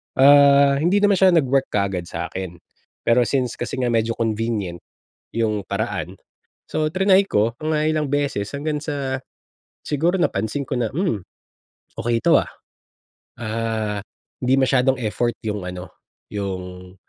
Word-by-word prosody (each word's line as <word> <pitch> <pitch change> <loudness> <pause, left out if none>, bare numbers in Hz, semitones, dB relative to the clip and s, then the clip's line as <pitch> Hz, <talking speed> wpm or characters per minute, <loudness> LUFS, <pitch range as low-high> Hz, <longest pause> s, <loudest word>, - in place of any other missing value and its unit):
Ah, 140 0 +6
hindi 185 +7 +2
naman 200 -2 +4
siya 185 -2 +5
nag-work 135 -3 +2
kaagad 95 -4 -1
sa - - -5
akin. 95 -2 -5 0.5
Pero 120 0 +3
since 125 -1 -1
kasi 120 - -3
nga 125 -2 0
medyo 115 0 +1
convenient, 110 -5 -2 0.5
yung 110 -3 -1
paraan, - - -4 0.5
so, 155 -1 -1
tinry 190 +2 +4
ko 110 - +1
mga 155 0 +1
ilang 155 -1 0
beses 140 -8 -1
hanggang 150 +1 -2
sa, 140 -3 -3 0.6
siguro 170 +6 0
napansin 110 - -1
ko 135 - -2
na, 120 -3 -1
"Hmm, 145 - -1 0.8
okey 115 -1 0
to, - - +5
ah." - - -3 0.9
Ah, 110 -2 -2 0.4
hindi 130 +1 +4
masyadong 130 0 +2
effort 120 +1 -1
yung 105 -3 -3
ano, 90 0 -6 0.4
yung, 90 -2 -6
120 Hz, 135 wpm, -22 LUFS, 105-145 Hz, 0.9 s, Ah